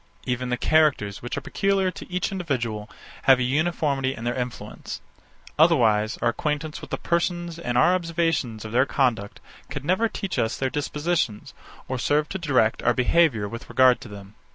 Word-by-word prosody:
Even 125 0 -2
the 125 - 0
characters, 140 -10 +2
which 120 - -5
are - - -2
peculiar 195 -1 +1
to - - -11
each 180 +2 -1
individual, 120 - -3 0.4
have 135 -1 +7
a 130 - 0
uniformity 140 -1 0
in 115 - -8
their 120 +1 0
influence; 125 -1 -6 0.6
otherwise 115 -9 +4
our 120 - +4
acquaintance 150 +4 -3
with - - -10
the - - -2
persons 175 -1 -1
and 120 -7 -2
our 175 +8 +5
observation 165 -9 -1
of 110 - -7
their 130 +4 +3
conduct 115 -7 0 0.3
could 140 -1 -6
never 205 +7 +2
teach 195 -3 -4
us 110 +1 0
their 130 -1 -1
dispositions, 150 -6 -2 0.3
or 130 -1 -3
serve 150 +5 +1
to 190 - -4
direct 130 -9 +2
our 120 0 +2
behaviour 125 -5 +3
with 115 +3 -8
regard 130 -1 +4
to - - -9
them. 100 -1 -11
135 Hz, 175 wpm, -24 LUFS, 120-165 Hz, 0.6 s, have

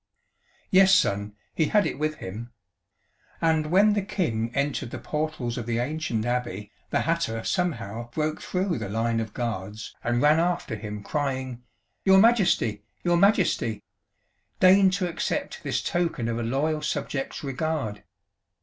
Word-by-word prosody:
"Yes, 190 0 +7
Son, 100 +1 +1 0.2
he 160 - +2
had 210 +5 +3
it - - -3
with 155 0 0
him. 115 +4 -7 0.9
And 160 -2 +2
when 200 +6 +5
the 205 - +1
King 120 - -1
entered 140 -2 -1
the - - -6
portals 150 -6 -3
of 115 - -6
the 115 -1 0
ancient 125 -3 -2
Abbey, 120 -5 -2 0.2
the - - +1
hatter 155 -9 -1
somehow 120 - -2
broke 155 +5 -2
through 185 -6 -1
the 105 -3 -4
line 115 +2 0
of 110 -2 -5
guards 110 -3 -4
and 120 0 +1
ran 150 +4 +5
after 170 -8 0
him 105 -1 -6
crying 130 -3 -2 0.4
'Your 190 0 +6
Majesty! 190 - +3 0.2
Your 175 -1 +3
Majesty! 180 - +2 0.8
Deign 190 +1 +7
to 185 -1 -1
accept 170 - -3
this - - -2
token 165 -9 -1
of 115 0 -1
a - - -2
loyal 145 +7 0
subject's 145 -2 -3
regard!' 135 -5 -2
140 Hz, 150 wpm, -26 LUFS, 115-170 Hz, 0.9 s, Yes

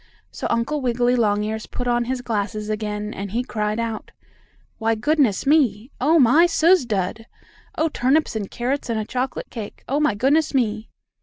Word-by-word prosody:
So - - -4
Uncle 280 +6 0
Wiggily 245 0 +1
Longears 215 -1 0
put 245 - -5
on 240 0 +1
his 255 +1 -2
glasses 215 -1 -2
again, 210 0 -3
and 200 0 -5
he 235 +5 -1
cried 215 -3 -2
out: 230 -2 -4 0.7
"Why, 225 0 +1
goodness 275 -2 +1
me! 270 -5 +2
Oh, 310 +5 +4
my 300 +5 +6
suz 335 -4 +3
dud! 210 +2 -2 0.5
Oh, 320 - +2
turnips 290 -1 +1
and 205 -3 -3
carrots 255 +2 -3
and 225 -1 0
a 215 - -3
chocolate 255 +3 -4
cake! 220 -4 -8
Oh, 280 +3 0
my 300 -8 +2
goodness 280 +7 +2
me!" 220 -3 0
235 Hz, 170 wpm, -22 LUFS, 215-270 Hz, 0.7 s, my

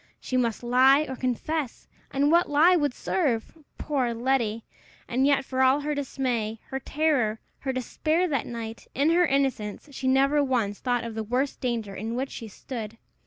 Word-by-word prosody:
She 255 - -4
must 240 -2 0
lie 260 +4 +5
or 260 - -4
confess! 255 +3 -3 0.2
And 285 +2 +2
what 345 +1 +4
lie 315 +5 +5
would 290 -6 0
serve? 265 -11 -1 0.2
Poor 260 -6 -1
Letty! 230 -3 0 0.4
And 260 +3 +2
yet, 280 -1 +2
for 260 0 -1
all 265 +2 +4
her 300 +1 -1
dismay, 245 -6 -2
her 265 - -3
terror, 270 -7 0 0.2
her 270 - -2
despair 310 +7 0
that 280 -7 -1
night, 230 -1 -7
in 285 +4 +3
her 350 +1 +4
innocence, 270 -3 -1
she 265 -1 -4
never 275 +3 +4
once 235 -7 0
thought 245 -2 0
of 230 -1 -5
the 220 0 -3
worst 255 +5 -1
danger 230 -6 -2
in 220 +4 -4
which 265 +2 -2
she 230 - -7
stood! 225 +1 -7
260 Hz, 175 wpm, -26 LUFS, 230-285 Hz, 0.4 s, lie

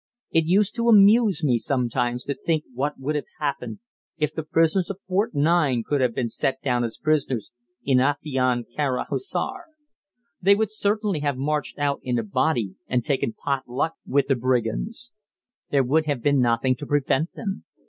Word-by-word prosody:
It 165 -1 +3
used 195 +5 +2
to 235 0 +2
amuse 210 -4 +6
me 125 -5 +3
sometimes 120 -1 -1
to 140 - -2
think 160 +1 -1
what 145 +4 -2
would 140 +3 -2
have 150 - -3
happened 150 +7 -3 0.4
if 150 -1 -1
the 160 - -3
prisoners 165 +3 +1
of 195 - -4
Fort 190 -1 0
9 145 -5 +2
could 145 -2 0
have 125 -3 +1
been 125 - 0
set 130 +3 -1
down 125 -3 +1
as 115 -1 -4
prisoners 140 -7 0 0.3
in 130 -2 +4
Afion 130 -3 +1
Kara 140 -4 0
Hissar. 385 -2 -3 0.8
They 200 +2 +6
would 215 0 0
certainly 210 -4 0
have 145 -2 -1
marched 150 +2 -2
out 145 -1 0
in 125 -1 -1
a 115 - 0
body 120 -2 0
and 125 -2 0
taken 135 -5 0
pot 135 -3 -3
luck 140 +6 -1
with 140 0 +1
the 135 - +2
brigands. 130 - -1 0.6
There 140 -2 +3
would 155 +5 +1
have 140 -6 -1
been 145 -1 +3
nothing 125 +1 +2
to 145 - -7
prevent 145 +2 +1
them. 195 -4 -5
145 Hz, 180 wpm, -24 LUFS, 130-165 Hz, 0.8 s, amuse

